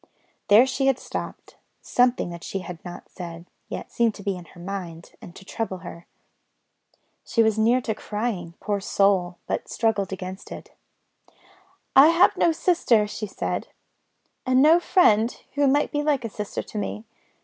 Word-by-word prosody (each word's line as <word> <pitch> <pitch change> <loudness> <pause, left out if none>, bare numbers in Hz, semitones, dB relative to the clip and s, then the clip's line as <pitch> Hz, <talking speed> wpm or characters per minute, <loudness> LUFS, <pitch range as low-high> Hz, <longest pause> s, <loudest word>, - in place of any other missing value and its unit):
There 215 +5 +7
she 265 +1 -1
had 270 -2 +3
stopped; - - -7 0.2
something 245 -7 +1
that 170 0 -9
she 195 - -4
had 175 -2 -9
not 175 -1 -9
said, 170 -2 -9 0.2
yet, - - -6
seemed 230 -2 +1
to 200 - -11
be 195 -1 -1
in 180 -1 -10
her 175 - -17
mind, 175 -3 -7
and 175 - -12
to 190 - -13
trouble 205 -2 -4
her. 170 0 -10 1.2
She 230 - +2
was 220 -1 +1
near 235 +4 +3
to 225 - -2
crying, 210 -6 -4
poor 205 -1 -2
soul, 190 -2 +1
but - - -3
struggled 210 -4 0
against 190 0 -7
it. - - -9 1.2
"I 275 +3 +9
have 335 +2 +5
no 340 - +3
sister," 315 - +2
she 210 +1 -5
said, 195 - -3 0.8
"and 255 0 +2
no 315 +5 +6
friend 235 - +3
who 285 0 +2
might 285 +2 +2
be 295 - 0
like 290 -5 0
a - - -3
sister 210 -1 -5
to - - -9
me. 210 +2 -5
210 Hz, 170 wpm, -24 LUFS, 185-255 Hz, 1.2 s, I